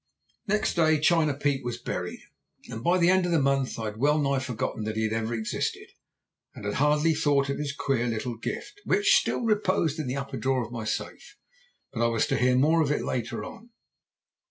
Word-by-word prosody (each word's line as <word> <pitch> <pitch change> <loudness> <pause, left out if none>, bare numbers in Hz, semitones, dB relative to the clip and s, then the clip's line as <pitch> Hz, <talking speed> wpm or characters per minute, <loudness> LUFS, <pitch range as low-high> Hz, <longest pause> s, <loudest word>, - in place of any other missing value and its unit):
"Next 210 +2 +1
day 160 -2 +3
China 155 -2 +3
Pete 140 -1 -1
was 120 -1 -4
buried, 90 -6 -5 0.5
and 115 0 -6
by 175 +5 +3
the 175 0 +4
end 185 -1 +3
of - - -1
the 165 - +3
month 135 -1 +1
I 110 - -4
had 105 0 -5
well 145 +5 +3
nigh 140 -2 +1
forgotten 125 -3 -3
that 110 0 -3
he 110 - 0
had 110 0 0
ever 115 +1 -1
existed, 110 -1 -3 0.7
and - - -9
had 105 - -1
hardly 150 +4 +3
thought 145 -3 +1
of 140 - -2
his 145 -1 -2
queer 135 -4 -1
little 115 +1 -3
gift, 405 - -6
which 405 -1 +3
still - - +1
reposed 185 -8 +1
in 150 - -3
the 130 +2 -2
upper 135 -1 -5
drawer 130 +1 0
of 115 - -12
my 115 -3 -5
safe. - - -5 0.6
But 115 -2 -1
I - - +4
was 115 -1 +1
to - - +1
hear 125 0 +3
more 155 +6 +4
of 150 - +1
it 150 - 0
later 120 -1 -3
on. 235 - -11
140 Hz, 215 wpm, -27 LUFS, 115-155 Hz, 0.7 s, the